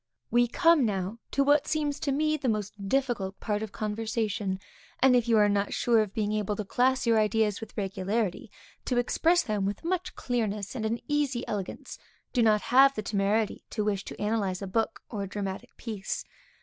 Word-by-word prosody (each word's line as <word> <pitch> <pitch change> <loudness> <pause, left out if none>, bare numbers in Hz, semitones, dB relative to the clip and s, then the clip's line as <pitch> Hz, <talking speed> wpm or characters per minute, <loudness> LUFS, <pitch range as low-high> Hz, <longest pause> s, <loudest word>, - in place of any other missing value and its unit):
We 240 +1 +4
come 330 +3 +4
now 200 0 -2
to 275 - +2
what 290 +1 +3
seems 295 -2 -1
to 280 - -1
me 305 +2 +1
the 270 -4 -1
most 205 -2 -3
difficult 240 -8 0
part 210 -1 -1
of 220 -2 -5
conversation, 215 -2 -2 0.4
and 260 -1 +5
if 240 -1 +2
you 230 -1 +4
are 210 -1 +5
not 200 0 0
sure 235 -2 +3
of 210 -3 -2
being 210 0 -1
able 210 -1 -1
to 210 - -4
class 255 +5 +2
your 230 -1 +4
ideas 215 0 +1
with 225 - -10
regularity, 195 0 -2 0.4
to 250 - 0
express 330 +8 +3
them 210 -3 -1
with 200 +8 -2
much 360 +1 -2
clearness, 215 -5 -2
and 220 -4 -2
an 230 +2 -2
easy 290 -5 0
elegance, 200 -3 -5 0.3
do 245 - +3
not 215 -2 +4
have 270 +2 +5
the 215 - -3
temerity 205 +1 0
to 210 - -2
wish 200 -2 -1
to - - -8
analyze 205 -3 -1
a - - -2
book, 220 +4 -1
or 210 -4 -5
a 195 - -3
dramatic 195 -2 -5
piece. 215 -5 -4
220 Hz, 195 wpm, -28 LUFS, 205-250 Hz, 0.4 s, and